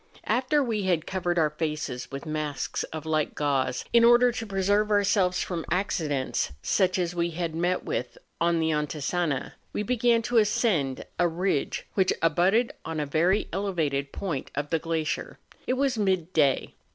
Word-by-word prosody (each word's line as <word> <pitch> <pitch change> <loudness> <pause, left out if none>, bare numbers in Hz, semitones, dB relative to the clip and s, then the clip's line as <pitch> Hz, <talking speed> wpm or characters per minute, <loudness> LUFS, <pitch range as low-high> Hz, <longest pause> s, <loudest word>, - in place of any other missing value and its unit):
After 265 +4 +2
we 225 -4 -1
had 175 -4 +1
covered 175 -2 -1
our 155 -2 +3
faces 150 -5 -3
with 140 +2 -7
masks 155 -2 -3
of 155 -1 -7
light 155 -1 0
gauze, 135 -4 0
in 235 -1 +6
order 240 +1 +6
to 225 -1 -5
preserve 200 +2 +1
ourselves 200 -3 +2
from 170 -3 -4
accidents 155 - -1
such 185 - +2
as 175 -1 -1
we 170 -1 0
had 170 -1 -3
met 175 +3 0
with 125 - -3 0.2
on 170 0 +3
the 160 0 +1
Antisana, 150 0 -1 0.2
we 210 - -1
began 235 0 +2
to 240 0 +3
ascend 190 - +1
a 175 - +4
ridge 170 -3 -1
which 190 -2 +2
abutted 180 +9 +3
on 160 -1 -4
a 150 - 0
very 170 +8 +2
elevated 160 -8 -1
point 165 -9 -4
of 145 +1 -3
the 165 - +2
glacier. 160 -1 -2 0.3
It - - +2
was 260 -3 0
midday. 175 -8 +1
175 Hz, 165 wpm, -27 LUFS, 155-200 Hz, 0.3 s, in